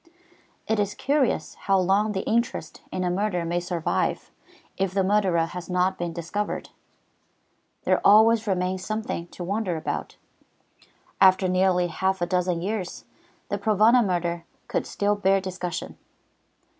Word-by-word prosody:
It 220 -1 +1
is 205 0 -1
curious 275 - 0
how 195 0 +1
long 195 +3 +2
the 190 - -3
interest 230 -8 -1
in 185 - -2
a 180 - 0
murder 180 -2 -1
may 170 +1 0
survive 175 -2 -2 0.4
if 190 -1 -2
the 195 - +3
murderer 190 -4 +2
has 180 +2 -8
not 180 +1 +1
been 175 -1 -2
discovered. 170 +5 -4 1.1
There - - +2
always 220 +2 +6
remains 185 -1 -1
something 215 -5 -3
to 175 - -8
wonder 190 -2 -1
about. 155 - -4 1.0
After 190 0 +6
nearly 185 -1 +2
half 190 +3 -1
a 175 - +1
dozen 180 -1 0
years 195 -2 -4 0.4
the 205 - -2
Provana 220 +4 +4
murder 175 -3 -1 0.2
could - - -2
still 205 0 0
bear 195 -1 +3
discussion. 185 -2 -5
190 Hz, 140 wpm, -25 LUFS, 180-205 Hz, 1.1 s, always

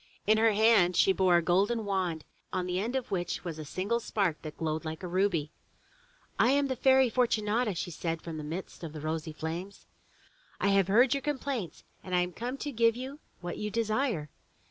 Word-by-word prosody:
In 215 +1 +4
her 225 -1 +4
hand 210 -4 +4
she 190 - +5
bore 185 -1 +3
a - - +7
little - - -11
golden 205 +6 +2
wand, 185 -5 -1 0.3
on 185 -1 -1
the 180 0 -1
end 230 +6 -2
of 260 -2 -3
which 175 -2 -2
was 165 -3 -5
a - - -4
single 195 +10 -1
spark 195 -8 -1
that 155 -1 -8
glowed 160 0 -2
like 160 +2 -6
a - - -3
ruby. 175 -4 0 0.9
"I - - +5
am 280 +1 +2
the 260 - 0
Fairy 265 +1 +5
Fortunata/' 220 -2 +1 0.2
said 165 0 -3
she - - -24
from 165 -2 -6
the 155 - -5
midst 170 +4 -6
of 160 -2 -6
the 155 - -6
rosy 160 +1 -3
flames. 165 +6 -6 0.7
I 200 - +2
have 195 -2 +3
heard 240 +7 +5
your 280 - -1
complaints 265 - -3 0.2
and 185 -1 -2
am 180 0 +1
come 245 +8 -4
to 290 +1 -4
give 230 -2 +3
you 265 +4 -7 0.2
what 175 0 -5
you 210 - -2
desire. 215 - -1
195 Hz, 210 wpm, -30 LUFS, 170-230 Hz, 0.9 s, a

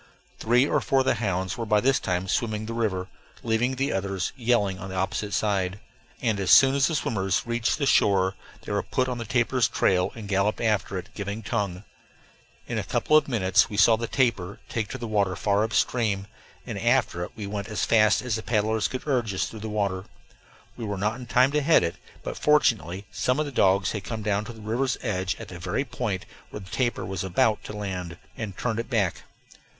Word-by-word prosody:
Three 125 +4 +3
or 150 - +1
four 135 -1 +2
of - - -2
the - - +3
hounds 95 -2 -2
were 115 - -2
by 105 -1 +4
this 135 +5 +3
time 90 0 -2
swimming 110 +1 -1
the 115 - -5
river, 100 -6 -1 0.4
leaving 120 +3 +1
the 135 +2 0
others 95 -1 -2
yelling 115 -6 +1
on 95 - -7
the 95 - -6
opposite 95 +2 -2
side; 100 -2 0 0.4
and 110 -4 +1
as 95 - -1
soon 135 -1 +8
as 140 -1 +3
the 160 - -1
swimmers 95 - 0
reached 120 -1 0
the 145 - 0
shore 95 -6 +3 0.3
they - - -6
were - - +1
put 130 - -1
on 125 -1 -3
the 115 - -4
tapir's 120 +1 +2
trail 90 -1 +1
and 110 -3 -8
galloped 100 +1 +1
after 105 -4 0
it, 90 - -7
giving 100 +2 -5
tongue. 100 -4 -2 0.8
In - - -2
a - - -2
couple 155 - +1
of 155 - +5
minutes 110 -3 +3
we 105 - -5
saw 115 +1 +6
the 115 +1 -4
tapir 110 -9 0
take 110 -2 -2
to 130 - -6
the 120 - -6
water 100 -4 +1
far 100 0 +1
up 110 - -2
stream, 105 -5 +1 0.4
and - - -5
after 85 - +1
it - - -8
we 105 - -6
went 100 0 -4
as 105 -2 -1
fast 110 -3 +4
as 125 -3 -2
the - - -5
paddles 110 -1 +1
could 130 - -6
urge 120 -8 0
us - - 0
through 110 - -8
the 110 +1 -5
water. 100 -3 -1 0.7
We 120 - -7
were 105 -2 -3
not 105 +4 -1
in 125 - -9
time 125 +3 +4
to 150 0 +1
head 155 - +5
it, 85 - -2 0.3
but - - -5
fortunately 105 - +2
some 130 +3 0
of 155 - +1
the 145 - -5
dogs 95 -5 +3
had 105 -3 -4
come 110 0 -5
down 105 0 0
to 120 - -7
the 110 - -13
river's 120 +4 -1
edge 95 -6 -1
at - - -10
the 90 - -8
very 90 +10 -2
point 105 -9 -3 0.2
where 105 - -7
the 95 - -12
tapir 120 -4 -1
was 95 -1 -3
about 105 +4 +1
to - - -7
land, 90 -4 -5 0.2
and 105 -4 -6
turned 115 -2 -1
it 115 - -4
back. 105 -8 0
105 Hz, 225 wpm, -26 LUFS, 95-120 Hz, 0.8 s, soon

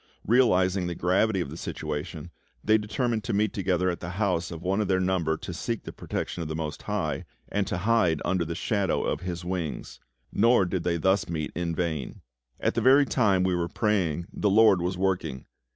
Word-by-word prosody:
Realising 95 -6 +3
the 85 - -3
gravity 95 +3 +2
of 70 - -4
the 80 - -7
situation, 75 -3 -5 0.3
they 110 +1 +4
determined 110 +1 -1
to - - -1
meet 105 0 +1
together 95 -2 0
at 85 - -5
the 90 - -6
house 90 -5 0
of 85 -1 -8
one 95 +3 +1
of 105 - -1
their 95 -1 +2
number 90 -4 0
to 90 - -7
seek 115 +6 -3
the - - -8
protection 90 - -4
of 80 - -3
the 80 - -3
Most 80 -1 -4
High, - - -2 0.3
and 100 -2 -1
to - - -2
hide 90 -5 +2
under 95 -1 +1
the 85 0 -4
shadow 100 -1 0
of - - -1
His 90 -1 -5
wings. 90 -4 -4 0.3
Nor 115 -1 +4
did 90 -1 -2
they 85 0 0
thus 95 +3 +1
meet 80 -3 -3
in 85 -1 -2
vain. 80 -5 -3 0.4
At - - +1
the - - 0
very 135 +2 +6
time 100 -9 +2
we 95 0 +1
were 85 -1 0
praying 90 -7 0
the 105 - +1
LORD 100 -3 +5
was 90 +1 -2
working. 90 -8 -1
90 Hz, 205 wpm, -27 LUFS, 85-105 Hz, 0.4 s, very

